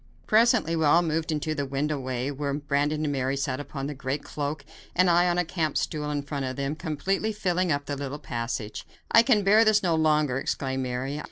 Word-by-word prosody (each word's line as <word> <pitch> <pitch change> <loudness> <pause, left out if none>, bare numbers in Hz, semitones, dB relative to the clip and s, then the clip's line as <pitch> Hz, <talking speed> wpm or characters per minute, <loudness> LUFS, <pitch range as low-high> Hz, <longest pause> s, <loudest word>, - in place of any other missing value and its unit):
Presently 220 -6 +3
we 160 - 0
all 160 +4 +5
moved 160 0 -1
into 155 0 -1
the 145 -2 -2
window 145 +2 -1
way, 130 +1 -3
where 140 0 -3
Brandon 145 +1 0
and 150 - 0
Mary 135 0 -1
sat 135 -1 -2
upon 140 -1 -5
the 145 - -3
great 135 +1 -3
cloak 145 0 -4 0.3
and 180 0 +4
I 175 +1 +4
on 175 - 0
a 180 - +1
camp 160 -3 -1
stool 150 -2 -2
in 145 -1 -2
front 140 -1 -4
of 130 0 -4
them, 140 +2 -2
completely 190 +7 -1
filling 185 -4 0
up 145 -1 -1
the 145 - -3
little 140 +1 -5
passage. 115 -5 -4 0.3
"I 230 - +8
can 230 -4 +3
bear 210 +3 +6
this 215 -2 +3
no 175 -2 +2
longer," 150 -4 +2
exclaimed 130 -1 -2
Mary. 130 +3 -3
150 Hz, 215 wpm, -26 LUFS, 140-170 Hz, 0.3 s, I